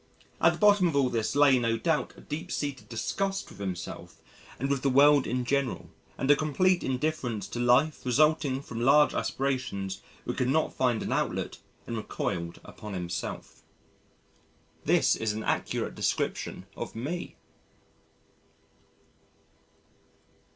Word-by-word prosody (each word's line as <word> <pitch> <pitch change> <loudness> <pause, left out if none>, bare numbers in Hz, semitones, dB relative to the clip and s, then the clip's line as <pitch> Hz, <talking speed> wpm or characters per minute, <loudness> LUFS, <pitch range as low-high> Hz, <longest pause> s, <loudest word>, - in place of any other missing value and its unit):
At - - +5
the - - -7
bottom 205 -3 +5
of 160 - -1
all 135 -2 +3
this 115 +2 -1
lay 140 -3 +6
no 115 -1 +1
doubt 160 +6 0
a - - -12
deep 150 +2 -6
seated 145 -2 -4
disgust 195 +12 -2
with 100 - -14
himself 90 -4 -6 0.4
and 135 - -1
with 140 -1 0
the 140 - +2
world 140 +1 +5
in 125 0 -1
general, 140 -1 -1 0.3
and 135 - +2
a - - +7
complete 175 +5 +2
indifference 125 -6 -2
to 120 - -5
life 125 +6 +3
resulting 140 +1 +2
from 115 -4 -6
large 145 +4 +5
aspirations 125 -8 -2 0.2
which - - -4
could 125 - +1
not 155 +3 +1
find 125 -4 +1
an - - -2
outlet - - -2 0.3
and 115 - -4
recoiled 85 -5 -3
upon 105 -2 -8
himself." 85 -2 -5 1.2
This - - +4
is 110 -2 -1
an 110 +1 -4
accurate - - -1
description - - -2
of - - -6
Me. 150 +10 -4
130 Hz, 140 wpm, -28 LUFS, 115-150 Hz, 1.2 s, a